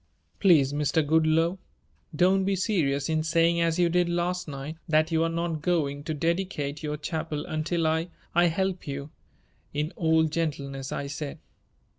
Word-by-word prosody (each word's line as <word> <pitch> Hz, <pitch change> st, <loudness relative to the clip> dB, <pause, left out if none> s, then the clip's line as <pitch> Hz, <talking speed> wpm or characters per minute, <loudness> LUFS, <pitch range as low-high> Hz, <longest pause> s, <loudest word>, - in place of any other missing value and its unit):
"Please, 150 Hz, -8 st, +5 dB
Mr. 150 Hz, +2 st, +1 dB
Goodloe, 160 Hz, +3 st, +2 dB, 0.6 s
don't 190 Hz, +4 st, +4 dB
be 195 Hz, +1 st, +1 dB
serious 155 Hz, -9 st, 0 dB
in 160 Hz, -1 st, +1 dB
saying 170 Hz, +1 st, +2 dB
as 165 Hz, 0 st, +1 dB
you 175 Hz, -1 st, +4 dB
did 175 Hz, +1 st, +2 dB
last 175 Hz, +1 st, -1 dB
night 145 Hz, +2 st, -6 dB
that 155 Hz, +1 st, +3 dB
you 160 Hz, 0 st, +2 dB
are 165 Hz, -, +1 dB
not 165 Hz, -2 st, -2 dB
going 145 Hz, -5 st, 0 dB
to 155 Hz, -, -2 dB
dedicate 165 Hz, -3 st, -2 dB
your 150 Hz, -1 st, -3 dB
chapel 155 Hz, -1 st, -3 dB
until 160 Hz, +2 st, -1 dB
I 160 Hz, +2 st, +1 dB, 0.3 s
I 175 Hz, +1 st, +5 dB
help 185 Hz, +1 st, -1 dB
you," 140 Hz, +1 st, -5 dB, 0.6 s
in 150 Hz, +3 st, -1 dB
all 160 Hz, -1 st, +3 dB
gentleness 140 Hz, -4 st, -2 dB
I 140 Hz, -, -3 dB
said. 140 Hz, +1 st, -5 dB
160 Hz, 160 wpm, -27 LUFS, 150-170 Hz, 0.6 s, Please